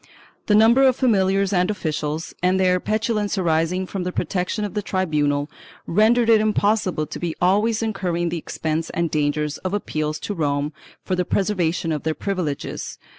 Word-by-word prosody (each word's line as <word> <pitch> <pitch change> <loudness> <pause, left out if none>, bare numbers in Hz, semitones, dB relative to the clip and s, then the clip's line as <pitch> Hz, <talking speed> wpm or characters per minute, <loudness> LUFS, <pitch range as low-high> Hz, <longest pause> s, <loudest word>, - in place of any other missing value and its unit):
The 210 - +4
number 225 +5 +6
of 260 -2 +5
familiars 195 -5 +2
and 180 +1 +2
officials, 155 -4 -3
and 185 +1 +2
their 180 -1 +3
petulance 215 0 -1
arising 170 +1 +1
from 190 +1 -5
the 180 0 -2
protection 190 +4 -2
of 205 - -6
the 210 - -1
tribunal, 150 -7 0 0.4
rendered 225 +5 +3
it 225 -2 +5
impossible 205 -6 +1
to - - -7
be 170 -2 -3
always 210 +5 +2
incurring 180 -6 -1
the 170 - -3
expense 160 +1 -3
and 170 -1 0
dangers 150 0 -1
of 185 +2 -2
appeals 155 -6 -2
to 205 - -3
Rome 145 -3 -1 0.3
for 185 - 0
the 180 - +1
preservation 180 -4 0
of 150 -2 -2
their 160 0 -1
privileges. 180 -8 -4
185 Hz, 170 wpm, -22 LUFS, 160-210 Hz, 0.4 s, number